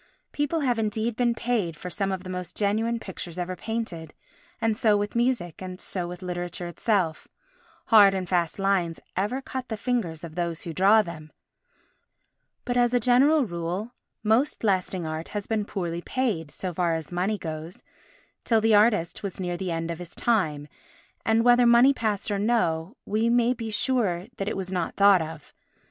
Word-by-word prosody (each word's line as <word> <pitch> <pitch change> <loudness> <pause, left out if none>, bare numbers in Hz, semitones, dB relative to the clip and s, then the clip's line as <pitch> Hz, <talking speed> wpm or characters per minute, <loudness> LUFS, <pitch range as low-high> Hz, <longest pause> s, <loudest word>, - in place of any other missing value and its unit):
People 295 +2 -1
have 245 -4 +1
indeed 220 +1 -1
been 240 -1 +1
paid 215 -10 -1
for 180 +3 -7
some 195 +5 -1
of 190 -1 -3
the 185 - -8
most 180 -1 -6
genuine 220 +3 0
pictures 185 -4 -7
ever 180 +1 -3
painted, 185 -7 -5 0.4
and 225 -1 +1
so 215 -3 +3
with 205 +2 -3
music, 235 -9 0
and 185 0 -7
so 180 -3 -3
with 180 +1 -8
literature 175 -1 -4
itself—hard 200 - +1
and 185 -1 -3
fast 170 -2 0
lines 195 -4 0 0.2
ever 225 +8 -1
cut 260 -1 -5
the 220 - -3
fingers 205 -9 -2
of 165 -2 -7
those 170 -1 -3
who 165 - -5
draw 200 +5 +5
them—but, 170 - -12
as 245 0 +3
a - - +4
general 260 +5 +4
rule, 175 +4 -4 0.3
most 225 +7 +2
lasting 185 -3 0
art 155 +1 -4
has 205 -1 -4
been 220 -2 -1
poorly 175 -4 -3
paid, 205 - -1
so 180 +4 -5
far 170 -1 +1
as 160 0 -6
money 185 +5 0
goes, 160 +2 -6 0.7
till 225 -2 +3
the 220 0 +3
artist 205 -5 +3
was 195 -2 -5
near 175 -1 -2
the 185 +1 -4
end 165 0 -2
of 165 - -6
his 175 -1 -8
time, 160 -11 0 0.6
and, 225 +1 +3
whether 245 0 +6
money 240 +4 +6
passed 215 -4 -2
or 200 - 0
no, 200 - 0
we 220 +3 +1
may 240 +1 +3
be 225 -2 -5
sure 210 -6 0
that 195 +1 -2
it - - -3
was 190 -1 -4
not 180 -3 -2
thought 200 -2 +6
of. 160 -1 -8
200 Hz, 180 wpm, -26 LUFS, 175-230 Hz, 0.7 s, whether